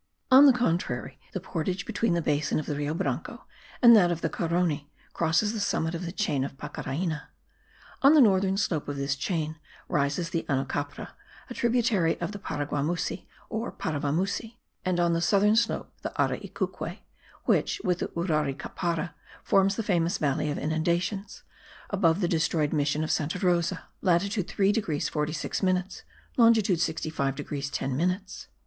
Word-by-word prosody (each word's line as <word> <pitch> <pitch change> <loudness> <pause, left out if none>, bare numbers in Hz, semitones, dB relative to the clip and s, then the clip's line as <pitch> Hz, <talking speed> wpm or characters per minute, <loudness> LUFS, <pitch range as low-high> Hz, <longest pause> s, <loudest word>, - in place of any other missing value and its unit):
On 270 +3 +9
the - - +9
contrary, 170 - -1
the 190 - -3
portage 180 +2 -3
between 225 -6 0
the 170 - 0
basin 145 0 +1
of 155 - -4
the 150 - -2
Rio 145 +2 -2
Branco - - -3 0.4
and 235 -1 +10
that 180 -5 +6
of 170 -1 -2
the 165 - -1
Carony 165 -4 0 0.2
crosses 170 +6 +1
the 220 - -3
summit 160 -5 0
of 170 +1 -4
the - - -4
chain 185 -9 0
of 135 0 -6
Pacaraina. 150 +2 -4 0.7
On 280 +3 +7
the - - +7
northern 195 -5 +4
slope 165 -6 -1
of 145 - -3
this 140 0 -1
chain 160 0 -2 0.3
rises 145 +4 0
the 165 - -1
Anocapra, 140 +1 -2 0.4
a - - -2
tributary 230 -8 +1
of - - -3
the 205 - -7
Paraguamusi 145 0 -2 0.2
or 225 +2 -3
Paravamusi; 180 +10 -2 0.3
and 185 -1 0
on 170 -1 +3
the 165 - 0
southern 205 +4 +4
slope, 230 0 0
the - - -4
Araicuque, - - -2 0.5
which, 420 - +2
with 180 -1 +1
the - - -1
Uraricapara, 165 +1 -1 0.3
forms 195 0 +3
the 225 - -2
famous 175 -1 +1
Valley 145 -1 0
of 145 - -2
Inundations, 170 +6 -1 0.5
above 190 -2 +2
the 175 - +2
destroyed 160 -2 +1
mission 150 0 +1
of 155 - -1
Santa 155 +4 0
Rosa 180 0 +1 0.2
(latitude 195 +1 +1
3 195 0 +2
degrees 185 -9 -1
46 150 0 -2
minutes, 185 0 0 0.4
longitude 225 -7 +5
65 155 -4 -1
degrees 140 0 -4
10 135 -2 -2
minutes). 185 +5 -2
170 Hz, 160 wpm, -27 LUFS, 150-195 Hz, 0.7 s, and